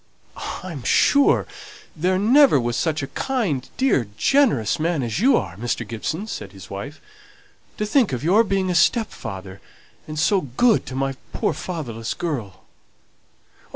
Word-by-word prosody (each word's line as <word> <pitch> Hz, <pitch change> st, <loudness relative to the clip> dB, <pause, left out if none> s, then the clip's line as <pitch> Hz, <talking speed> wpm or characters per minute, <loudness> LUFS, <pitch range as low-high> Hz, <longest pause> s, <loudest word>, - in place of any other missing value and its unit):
"I'm 170 Hz, -7 st, -6 dB
sure 280 Hz, -, +4 dB, 0.5 s
there 180 Hz, +4 st, +1 dB
never 240 Hz, -, +5 dB
was 120 Hz, -1 st, -1 dB
such 160 Hz, -3 st, -1 dB
a -, -, -3 dB
kind, 205 Hz, -, -1 dB
dear, 260 Hz, -, +2 dB
generous 230 Hz, -, +2 dB
man 160 Hz, -3 st, 0 dB
as 115 Hz, +5 st, -2 dB
you 260 Hz, +6 st, +5 dB
are, 90 Hz, -4 st, -4 dB
Mr. 115 Hz, 0 st, -3 dB
Gibson," 135 Hz, -, -4 dB
said 100 Hz, -, -7 dB
his 95 Hz, -, -12 dB
wife. 125 Hz, +10 st, -7 dB, 0.8 s
"To 210 Hz, -, -1 dB
think 225 Hz, -, +2 dB
of 125 Hz, 0 st, -3 dB
your 195 Hz, +8 st, +4 dB
being 195 Hz, -3 st, 0 dB
a -, -, 0 dB
stepfather! 100 Hz, -, -1 dB, 0.5 s
and 155 Hz, 0 st, -6 dB
so 190 Hz, +5 st, +2 dB
good 190 Hz, -, +2 dB
to 130 Hz, -, -6 dB
my 135 Hz, 0 st, -1 dB, 0.2 s
poor -, -, 0 dB
fatherless 120 Hz, -11 st, -5 dB
girl! 130 Hz, -, -4 dB
155 Hz, 150 wpm, -22 LUFS, -, 0.8 s, never